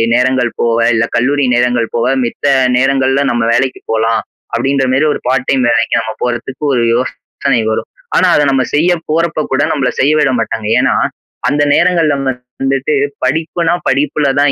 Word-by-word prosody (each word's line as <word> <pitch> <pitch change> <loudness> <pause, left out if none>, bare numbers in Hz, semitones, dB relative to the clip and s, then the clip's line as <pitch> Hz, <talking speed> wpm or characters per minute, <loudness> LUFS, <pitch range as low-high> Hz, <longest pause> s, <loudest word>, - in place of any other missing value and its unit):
நேரங்கள் 125 -1 +1
போக 115 -1 +1 0.2
இல்ல 115 +1 +2
கல்லூரி 135 +4 +1
நேரங்கள் 120 -1 +1
போக 115 - 0 0.2
மித்த 120 +4 -4 0.3
நேரங்கள்ல 135 +1 +2
நம்ம 120 - -1
வேலைக்கு 130 +2 0
போலாம், 115 0 +1 0.3
அப்படின்ற 135 0 0
மாரி 135 +4 +2
ஒரு - - -5
பார்ட் 125 0 0
டைம் 130 -2 +2
வேலைக்கு 120 - +1
நம்ம 110 0 -5
போறத்துக்கு 125 +3 -4
ஒரு 120 - +1
யோசனை 120 +2 -2
வரும். - - -3 0.3
ஆனா 185 - +4
அத 145 - +3
நம்ம 130 -1 +2
செய்ய 165 +4 +3 0.2
போறப்ப 165 0 0
கூட 130 - +1
நம்பள 130 -4 0
செய்ய 140 +3 +3
விட 135 -3 +2
மாட்டாங்க. 110 -1 -3
ஏன்னா, - - +2 0.5
அந்த 145 +1 0
நேரங்கள்ல 170 -4 +2 0.5
வந்துட்டு 135 +2 0 0.3
படிப்புனா 160 +4 0 0.2
படிப்புல 145 +2 0
தான் 145 -1 +3
130 Hz, 160 wpm, -14 LUFS, 120-145 Hz, 0.5 s, ஆனா